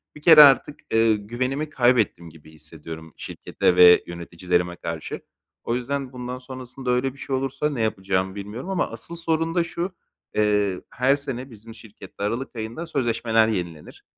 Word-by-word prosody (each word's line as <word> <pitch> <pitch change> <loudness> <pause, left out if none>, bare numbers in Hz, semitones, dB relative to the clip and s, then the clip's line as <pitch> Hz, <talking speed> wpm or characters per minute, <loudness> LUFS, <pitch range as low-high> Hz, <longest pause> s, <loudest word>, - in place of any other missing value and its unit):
bir 150 - -12
kere 155 -1 +10
artık, 145 +1 +4
eee, 115 -1 +4
güvenimi 130 +8 -3
kaybettim 120 - +2
gibi 80 -1 -16
hissediyorum 80 +1 -9
şirkete 90 - -1
ve 90 -1 +8
yöneticilerime 90 +1 -2
karşı. 85 -2 -6 0.4
O 115 - -1
yüzden 135 +1 -3
bundan 125 0 -5
sonrasında 130 0 -6
öyle 125 +1 +1
bir - - -18
şey 135 -1 -3
olursa 135 +3 -1
ne 135 -6 -3
yapacağımı 95 -3 -1
bilmiyorum 105 - -7
ama 190 -2 0
asıl 170 - -8
sorun 165 0 -1
da 175 - +3
şu: 175 +2 -4 0.4
Eee, 105 -3 +1
her 130 +3 +2
sene 135 -2 -6
bizim 110 +1 -12
şirkette 110 -2 -11
aralık 120 +6 -3
ayında 115 +9 -5
sözleşmeler 115 -6 +1
yenilenir; 85 -7 -5
115 Hz, 155 wpm, -24 LUFS, 95-135 Hz, 0.4 s, kere